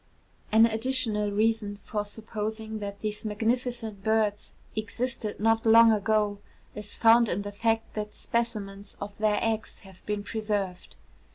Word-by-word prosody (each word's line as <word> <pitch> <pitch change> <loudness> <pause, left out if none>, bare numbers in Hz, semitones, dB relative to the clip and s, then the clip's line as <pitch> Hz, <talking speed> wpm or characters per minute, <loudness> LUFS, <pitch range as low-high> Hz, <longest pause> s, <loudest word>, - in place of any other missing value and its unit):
An 220 +1 +7
additional 225 -2 0
reason 215 -1 +1
for 210 -1 -3
supposing 220 +1 -5
that 200 -1 -6
these 210 -1 -3
magnificent 225 -1 -2
birds 215 -1 0 0.2
existed 220 0 -3
not 225 +1 +3
long 230 0 +7
ago 210 -1 +1 0.3
is 210 -1 -6
found 230 0 +5
in 200 +3 -1
the 205 - -5
fact 225 +2 0
that 210 -1 -5
specimens 205 -4 -3
of 200 0 -6
their 210 -1 +2
eggs 225 -1 -2
have 190 -2 -16
been 210 -1 -2
preserved. 205 -4 -3
215 Hz, 140 wpm, -28 LUFS, 205-225 Hz, 0.3 s, An